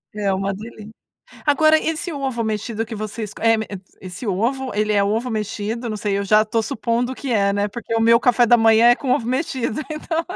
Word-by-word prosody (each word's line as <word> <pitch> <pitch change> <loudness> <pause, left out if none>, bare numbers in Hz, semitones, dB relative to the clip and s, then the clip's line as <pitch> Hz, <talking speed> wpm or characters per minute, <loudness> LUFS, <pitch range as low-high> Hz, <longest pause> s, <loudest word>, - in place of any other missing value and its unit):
É 200 -2 0
uma 195 +1 -1
delícia. 215 +1 -10 0.5
Agora, 310 +2 +5
esse 325 +2 -3
ovo 265 -5 -3
mexido 220 +1 -3
que 225 - -7
vocês, 215 0 -5
eh 225 0 +4
m 220 - -3 0.4
esse 185 +5 -8
ovo, 245 +7 -1
ele 210 0 0
é 200 - +3
ovo 220 +5 -1
mexido? 220 +2 -3
Não 215 - -3
sei, 200 -1 -1
eu 200 - -1
já 215 +2 +5
estou 220 +1 0
supondo 240 0 -1
que 270 - -5
é, 200 -3 +2
né, 205 +1 0
porque 230 +2 -6
o 225 - +2
meu 230 +1 +5
café 245 -1 +3
da 240 - +6
manhã 225 0 +5
é 240 - +6
com 265 -1 -3
ovo 235 - +1
mexido 255 -3 -2
então, 320 +2 -2
225 Hz, 215 wpm, -21 LUFS, 210-250 Hz, 0.5 s, da